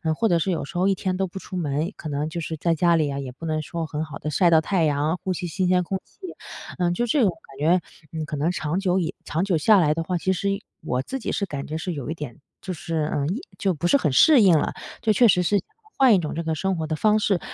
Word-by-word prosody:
或 225 - +1
者 175 -3 +3
是 190 +3 0
有 165 - -2
时 175 - -7
候 185 +2 +2
一 - - +4
天 185 0 -2
都 195 - +1
不 190 +1 -7
出 185 - -9
门， 155 +2 -1
可 155 - -7
能 145 +1 -2
就 170 +1 -4
是 160 0 -4
在 165 +2 +1
家 170 +1 +3
里 155 -2 +1
呀， 140 -1 -3
也 130 -2 -5
不 155 +6 -10
能 155 -1 -1
说 165 +2 -4
很 155 0 -3
好 155 -3 -8
地 155 - -4
晒 170 +4 +3
到 160 -1 +5
太 180 0 0
阳、 150 +3 +1
呼 190 - -1
吸 175 0 -4
新 180 +2 -1
鲜 180 0 +3
空 190 +2 -3
气。 - - -29 0.6
呃， 175 -1 +1
就 240 +7 0
这 260 +4 +2
种 210 - +4
感 135 -4 -16
觉， 170 +4 +3 0.3
嗯， 160 -1 -4
可 150 - -5
能 160 +5 +1
长 170 0 -2
久 190 -1 +1
以 170 0 -2
长 160 +4 -1
久 190 -4 +1
下 205 +7 +5
来 150 -4 +3
的 165 +1 -2
话， 180 +1 -1
其 190 +3 0
实 200 +2 -1 0.3
我 125 +1 -1
自 265 - -5
己 - - -3
是 200 - -1
感 140 -6 -6
觉 155 +1 -3
是 175 +2 -3
有 145 -2 -5
一 - - -1
点 150 -7 -7 0.2
就 185 - -4
是， 160 -1 -2
嗯 145 0 0 0.3
就 190 -2 +1
不 170 +3 -2
是 280 - +5
很 160 - 0
适 265 - +6
应 180 -5 +6
了。 - - -1 0.3
就 215 -2 +3
确 240 +2 +5
实 180 -3 +4
是 200 +3 +2 0.4
换 260 -4 +6
一 185 - +3
种 155 - -4
这 170 - -2
个 160 -1 -1
生 190 +4 -1
活 160 - -2
的 155 - -1
方 215 +6 +3
式， 195 -3 +1
170 Hz, 310 characters per minute, -24 LUFS, 155-190 Hz, 0.6 s, 适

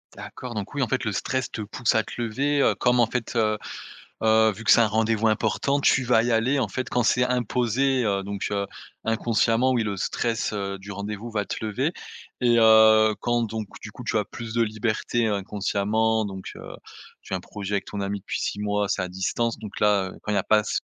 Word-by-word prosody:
D'accord, 125 -2 -8
donc 105 +5 -5
oui 140 - -2
en 125 - +2
fait - - -1
le 110 - -1
stress 130 +5 -2
te 110 - -5
pousse 110 +3 -1
à 110 - +3
te - - -10
lever, 140 +5 0
heu, - - +3
comme 125 -1 +3
en 115 - +4
fait, 120 +1 -4
heu, 110 -2 +2 0.7
heu, 110 0 +4
vu 105 +3 -10
que - - +2
c'est - - +7
un 115 - +5
rendez-vous 110 +1 +1
important 110 +6 +1
tu 130 -2 +3
vas 120 -2 +4
y 120 - -1
aller 125 +5 +2
en 115 - 0
fait 130 +5 -4
quand 125 - +1
c'est 125 +2 +3
imposé. 125 +1 +1
Heu, 100 -2 0
donc, 100 0 -4
heu, 100 -1 0 0.4
inconsciemment 115 +2 +2
oui 120 -2 +1
le 105 -2 -3
stress, 115 +5 -1
heu, 100 -1 -3
du 100 +1 -9
rendez-vous 105 +3 -5
va 105 -2 -1
te - - -4
lever 130 - -1 0.5
et 120 -2 +4
heu, 110 -1 +6
quand 120 0 0
donc 110 -1 -3 0.2
du - - -7
coup - - -10
tu - - -1
as - - 0
plus 115 -2 -8
de 115 - +3
liberté 110 +1 -1
inconsciemment 105 +2 0
donc, 95 -2 -7
heu, - - -10 0.5
tu - - -12
as - - +1
un - - -5
projet 100 +2 -6
avec 100 - -1
ton 100 - -5
ami 100 +1 -3
depuis 95 - -4
6 100 - -3
mois, 105 -1 0
c'est 95 - 0
à 90 - -3
distance 95 +6 -2
donc 105 -2 -8
là, 100 -3 +2
heu, - - -13
quand 105 - -4
il 105 - +1
y - - +3
a - - -1
pas 105 0 +4
ce - - -4
s - - +1
110 Hz, 240 wpm, -25 LUFS, 105-120 Hz, 0.7 s, c'est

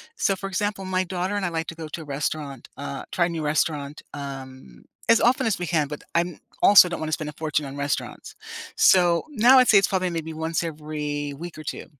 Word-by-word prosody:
So, 195 - +1
for 195 +1 -6
example, 195 0 -2
my 185 0 0
daughter 185 +2 -3
and 200 -2 -1
I - - 0
like 165 -1 -3
to 170 - -6
go 160 -1 -7
to 165 - -6
a - - -7
restaurant 140 -2 -4
uh, 140 -1 -5
try 175 - +2
a - - -5
new 165 -2 -4
restaurant, 150 -1 -1
um, 130 - -9 0.2
as 230 - +5
often 245 +2 +3
as 215 -5 0
we 175 - -3
can, 155 -4 +1
but 150 0 -7
I'm 170 -1 0 0.2
also 200 -3 +9
don't 170 - -4
wanna 155 0 -3
spend 155 -1 -2
a - - -9
fortune 150 -1 -2
on 135 - -7
restaurants. 140 0 -4 0.4
So, 175 -2 +5
now 255 -1 +6
I'd 255 - +5
say 210 - +7
it's 195 - +4
probably 185 -2 0
maybe 160 -1 -4
once 160 +1 -2
every 150 -2 -4
week 175 0 -8
or 155 - -8
2, - - -5
160 Hz, 230 wpm, -24 LUFS, 150-185 Hz, 0.4 s, also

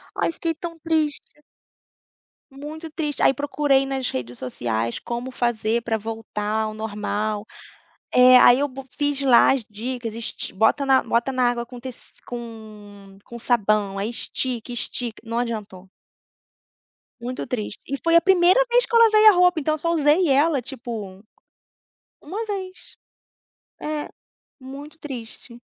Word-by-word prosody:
Ai, - - 0
fiquei 330 0 -2
tão 335 +1 -7
triste. 310 -2 -2 1.1
Muito 305 +4 -8
triste. 300 -2 -3
Aí - - +5
procurei 285 0 +1
nas 270 -2 -2
redes 125 -1 -5
sociais 115 -2 -3
como 240 +2 -5
fazer 235 -1 0
pra 225 -1 -1
voltar 220 -1 -3
ao 215 0 -3
normal. 210 0 -3 0.7
É. 250 0 +8
Aí, 245 0 +7
eu 285 - +1
bo 270 0 -9
fiz 290 -1 0
lá 255 -4 +6
as 265 -4 -2
dicas: 230 +1 -5
"esti 230 0 -5
bota 220 +8 +2
na 265 -1 +4
bota 235 +3 0
na 250 -1 +2
água 240 0 -3
com 245 0 -10
tec 255 0 -7 0.3
com 210 -4 -10
com 235 - -10
sabão, 215 -4 +1
aí 200 - -2
estica, 240 +2 -4
estica". 240 0 -3
Não 230 +1 -3
adiantou. 210 -6 -5 1.3
Muito 245 +2 -5
triste. 215 -4 -4
E 275 - -2
foi 335 0 +3
a 335 - +7
primeira 370 +3 +5
vez - - +4
que 480 - -14
eu - - +7
lavei 435 -1 +6
a 430 - +11
roupa, 360 -2 +4
então, 310 +1 0
eu - - -7
só 335 +2 -1
usei 315 +3 +3
ela 285 +1 +3
tipo, 225 -6 -7 1.0
1 440 +4 -5
vez. 380 -3 -7 0.9
É, 300 -1 -4 0.5
muito 280 +4 -10
triste. 240 -3 -9
250 Hz, 150 wpm, -23 LUFS, 220-295 Hz, 1.3 s, a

